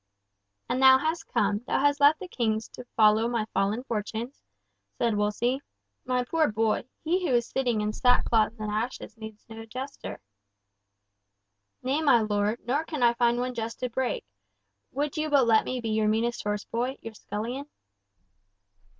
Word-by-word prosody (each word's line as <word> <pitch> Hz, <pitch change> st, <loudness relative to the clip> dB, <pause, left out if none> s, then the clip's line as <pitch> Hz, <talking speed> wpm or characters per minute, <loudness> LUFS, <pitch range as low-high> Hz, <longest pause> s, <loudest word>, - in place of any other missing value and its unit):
"And 250 Hz, +2 st, -1 dB
thou 265 Hz, 0 st, +8 dB
hast 315 Hz, +4 st, -2 dB
come, 205 Hz, 0 st, +1 dB
thou -, -, +1 dB
hast 285 Hz, +1 st, +2 dB
left 290 Hz, +2 st, +5 dB
the 375 Hz, -, -7 dB
King 220 Hz, -9 st, 0 dB
to 250 Hz, -, -9 dB
follow 215 Hz, +1 st, +5 dB
my 235 Hz, -2 st, -1 dB
fallen 200 Hz, +5 st, 0 dB
fortunes?" 230 Hz, +2 st, -4 dB, 0.6 s
said 235 Hz, -2 st, +1 dB
Wolsey. 220 Hz, +6 st, 0 dB, 0.4 s
"My 250 Hz, -1 st, +1 dB
poor 315 Hz, +1 st, +1 dB
boy, 220 Hz, +1 st, 0 dB, 0.2 s
he 355 Hz, +4 st, +1 dB
who 250 Hz, -, +2 dB
is 235 Hz, -1 st, +1 dB
sitting 245 Hz, -5 st, 0 dB
in 210 Hz, 0 st, -1 dB
sackcloth 230 Hz, -3 st, +3 dB
and 215 Hz, -1 st, -4 dB
ashes 225 Hz, +5 st, -3 dB
needs 220 Hz, -1 st, -10 dB
no 225 Hz, 0 st, -9 dB
jester." 255 Hz, +5 st, -7 dB, 1.6 s
"Nay, 270 Hz, +5 st, 0 dB
my 275 Hz, -7 st, +5 dB
lord, 210 Hz, +1 st, 0 dB
nor 275 Hz, +6 st, 0 dB
can 305 Hz, -5 st, -3 dB
I 235 Hz, 0 st, +5 dB
find 240 Hz, 0 st, +2 dB
one 250 Hz, +1 st, -2 dB
jest 230 Hz, -1 st, -5 dB
to 250 Hz, -1 st, -2 dB
break! 260 Hz, +1 st, -2 dB, 0.7 s
Would 290 Hz, +3 st, -2 dB
you 310 Hz, 0 st, -1 dB
but 280 Hz, -4 st, +4 dB
let 225 Hz, -1 st, +4 dB
me 255 Hz, -, -2 dB
be 230 Hz, -2 st, -3 dB
your 215 Hz, 0 st, +1 dB
meanest 230 Hz, +2 st, 0 dB
horse 210 Hz, 0 st, -2 dB
boy, 250 Hz, +3 st, -2 dB
your 225 Hz, -, -7 dB
scullion!" 235 Hz, +8 st, -5 dB
235 Hz, 165 wpm, -27 LUFS, 220-265 Hz, 1.6 s, thou